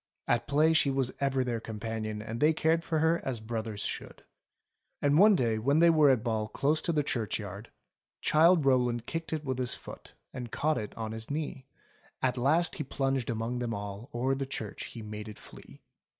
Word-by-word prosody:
At 120 - +1
play 155 +3 +4
she 150 -3 +4
was 135 -2 0
ever 135 -2 +1
their 120 -2 -2
companion 110 -1 -4
and 115 +1 -5
they 155 +2 +4
cared 160 +1 +2
for 160 - -1
her 160 +2 +2
as 130 -4 -2
brothers 110 -1 -4
should. - - -5 0.8
And 145 +2 +3
one 210 +1 +7
day 115 -8 +1
when 140 +7 +2
they 170 +1 +6
were 155 -3 +5
at 125 -4 +3
ball 110 -3 -1
close 145 +8 +1
to - - -1
the 150 -2 +1
churchyard 105 -4 -3 0.3
— - - -66
Childe 165 0 +5
Rowland 125 -3 +2
kicked 165 0 -4
it 155 -2 -3
with 130 -1 -2
his 125 -2 -1
foot - - -11 0.2
And 125 -3 -6
caught 155 +1 +1
it 105 - -7
on 110 -1 -4
his 110 0 -7
knee. 145 -3 -4 0.5
At 130 -1 +1
last 155 +8 +2
as - - -6
he - - 0
plunged 135 -2 -1
among 115 +2 -2
them 120 -2 -2
all 100 +4 -6
O'er 130 +3 0
the 135 0 -3
church 110 -6 -5
he 115 - -9
made 105 0 -7
it 105 - -10
flee. - - -15
130 Hz, 210 wpm, -30 LUFS, 110-150 Hz, 0.8 s, one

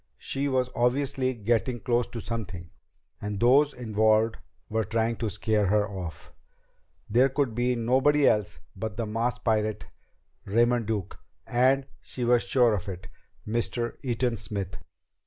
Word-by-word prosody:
She 140 +1 -2
was 130 -2 0
obviously 130 +1 +1
getting 120 +3 0
close 120 +2 +1
to 120 - -7
something 100 -8 -6 0.5
and 105 -1 -4
those 140 +5 +5
involved 110 -2 +2 0.3
were 110 0 0
trying 115 +1 0
to 110 - -2
scare 105 0 0
her 105 +1 +2
off. 90 -6 -8 0.8
It 130 +3 +4
could 140 -6 +1
be 125 +2 +1
nobody 130 +5 +3
else 105 -1 +1 0.2
but 105 +1 -5
the 115 - -1
masked 115 +3 -2
pirate, 110 -2 0 0.6
Raymond 120 +2 +2
Duke, 100 -4 -3 0.3
and, 130 +3 +2 0.2
she 125 - -5
was 120 0 +4
sure 120 -4 +3
of 100 -1 -3
it, 95 0 -8 0.4
Mr. 120 +1 -1
Eaton 120 -2 -1
Smith. 95 -3 -4
115 Hz, 140 wpm, -27 LUFS, 105-125 Hz, 0.8 s, those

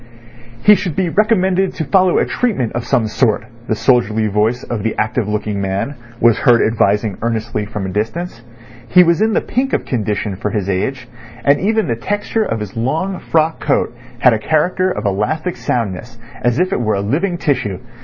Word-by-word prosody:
"He 210 - +8
should 180 -6 -1
be 185 -3 0
recommended 190 -1 +2
to 160 - -3
follow 185 0 +3
a - - +3
treatment 195 - -1
of 120 0 -3
some 110 - +2
sort," 110 +1 +1 0.2
the 110 - 0
soldierly 110 -3 +2
voice 110 +4 0
of 120 -3 -4
the 110 +1 -2
active 110 0 0
looking 105 -1 -2
man 95 +8 -2 0.3
was 115 -1 +4
heard 120 -1 +4
advising 105 -2 +1
earnestly 110 -2 -2
from 105 -3 -4
a - - -3
distance. 115 - -3 0.5
He 180 +6 +6
was 170 +2 +2
in 220 0 +2
the - - +2
pink 260 +3 -2
of - - 0
condition 105 -4 -2
for 105 - -2
his 105 -4 -2
age, 125 +7 -2 0.4
and 140 0 +4
even 220 +3 +1
the 115 - 0
texture 205 - -1
of 115 - -3
his 105 -2 -6
long 160 +11 -1
frock 160 0 0
coat 140 -4 0 0.2
had 125 0 +5
a 110 - 0
character 180 +8 +1
of 105 - -4
elastic 105 - -1
soundness, 115 -2 -3 0.2
as 120 0 +1
if 185 +1 +1
it - - 0
were 110 -3 +1
a 100 - -1
living 170 - -1
tissue. 125 - -1
120 Hz, 195 wpm, -17 LUFS, 105-175 Hz, 0.5 s, He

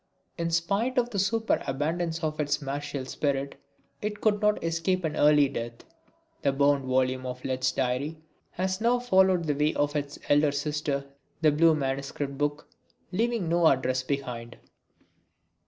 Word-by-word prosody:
In 170 0 -2
spite 200 +10 0
of 245 0 +2
the 200 - -1
superabundance 170 - 0
of 155 -1 -2
its 145 -1 +1
martial 140 -1 -4
spirit, 140 0 -2 0.4
it 210 0 -3
could 210 -1 +2
not 210 -3 +2
escape 165 +3 0
an 155 -2 -2
early 150 -1 +5
death. 115 -3 -6 0.6
That 135 -1 0
bound 140 -1 +3
volume 130 0 +1
of 125 0 -6
Lett's 130 -1 0
diary 135 +5 -1 0.4
has 185 +2 -2
now 240 +2 +3
followed 190 -7 +3
the 150 -2 0
way 150 +2 +1
of 145 +1 0
its 145 -1 -3
elder 145 0 +4
sister, 145 -1 -2 0.4
the 155 -2 +5
blue 160 +2 +4
manuscript 140 0 -3
book, 145 +1 -2 0.4
leaving 225 -1 0
no 170 0 +4
address 130 -2 +2
behind. 125 -3 -4
150 Hz, 150 wpm, -27 LUFS, 140-175 Hz, 0.6 s, early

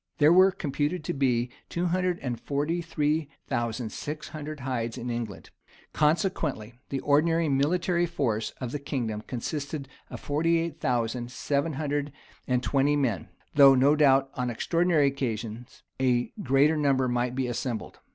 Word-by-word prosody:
[] 90 - -51
There 150 +3 +6
were 185 +2 +7
computed 150 0 -2
to - - -2
be 125 -3 +1 0.2
two 175 +1 -1
hundred 180 0 +1
and 120 -3 -3
forty 150 +5 -1
three 150 -2 -1 0.2
thousand 120 -2 -2
six 150 +1 -6
hundred 155 -2 -7
hides 120 -3 -3
in 120 +1 -4
England;[] 115 -4 -5 0.4
consequently 150 - 0 0.2
the 135 -1 -2
ordinary 165 +3 +3
military 170 +5 +1
force 115 -10 -1
of 125 -3 -4
the 145 - -3
kingdom 120 -7 -3
consisted 140 +4 -4 0.2
of - - -7
forty 165 +4 +1
eight 165 -2 -3
thousand 120 0 -1
seven 140 +4 -1
hundred 145 0 -2 0.4
and 125 -1 +1
twenty 140 +2 +2
men; 120 - 0 0.3
though, 140 -2 +8
no 140 +3 +5
doubt, 135 -2 +4
on 125 -1 -2
extraordinary 165 +5 +2
occasions, 120 -4 -3 0.2
a 125 -2 +1
greater 140 +3 +3
number 135 -3 +2
might 120 0 -1
be 130 -1 0
assembled. 120 -1 -4
140 Hz, 155 wpm, -27 LUFS, 125-155 Hz, 0.4 s, though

